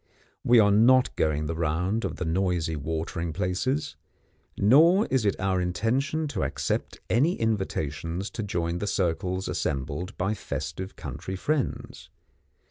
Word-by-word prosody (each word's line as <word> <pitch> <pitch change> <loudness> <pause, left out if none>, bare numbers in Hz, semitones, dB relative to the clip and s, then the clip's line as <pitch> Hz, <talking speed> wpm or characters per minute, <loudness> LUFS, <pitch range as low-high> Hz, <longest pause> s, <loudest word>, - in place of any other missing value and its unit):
We 120 - +5
are 105 -2 +6
not 125 +5 +5
going 75 -1 0
the 80 - -2
round 85 +7 -1
of - - -3
the 90 - -4
noisy 85 -1 0
watering 80 +2 -3
places, 110 - -1 0.6
nor 165 - +6
is 130 -5 +2
it 100 - +1
our 95 -1 +1
intention 130 - 0
to - - -3
accept - - -2
any 145 +10 +2
invitations 95 -4 -2
to 115 - -4
join 85 -4 -2
the 105 - -3
circles 95 0 -1
assembled 75 +6 -3
by 95 +4 0
festive 95 -2 -5
country 95 - -6
friends. 145 +7 -3
95 Hz, 135 wpm, -27 LUFS, 85-115 Hz, 0.6 s, are